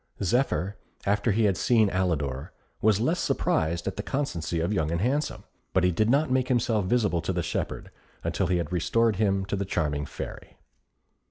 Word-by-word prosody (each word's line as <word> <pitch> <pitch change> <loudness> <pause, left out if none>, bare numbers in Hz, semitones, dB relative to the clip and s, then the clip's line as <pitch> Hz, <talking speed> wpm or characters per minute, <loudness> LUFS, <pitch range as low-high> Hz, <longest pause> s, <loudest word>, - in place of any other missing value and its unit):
Zephyr, 100 - +1 0.3
after 105 +3 +2
he 110 +3 +2
had 100 -4 +3
seen 110 -5 +3
Alidor, 75 -8 -1 0.3
was 105 -2 +4
less 160 +10 +1
surprised 85 - 0
at 95 - -3
the - - -1
constancy 90 - -2
of 85 +5 0
Young 80 -6 0
and 85 +1 -1
Handsome; 135 - -1 0.3
but 95 - +3
he 90 - +4
did 110 +6 +1
not 140 +2 +3
make 130 -1 +2
himself 115 -5 +1
visible 100 -5 +1
to 85 - -2
the 90 -1 -1
shepherd - - -3 0.3
until - - 0
he 90 0 +2
had 85 -1 -3
restored 110 +4 +2
him 95 -2 +1
to 100 - -2
the 100 - -1
charming 75 -6 -1
Fairy. - - -8
100 Hz, 185 wpm, -27 LUFS, 85-115 Hz, 0.3 s, was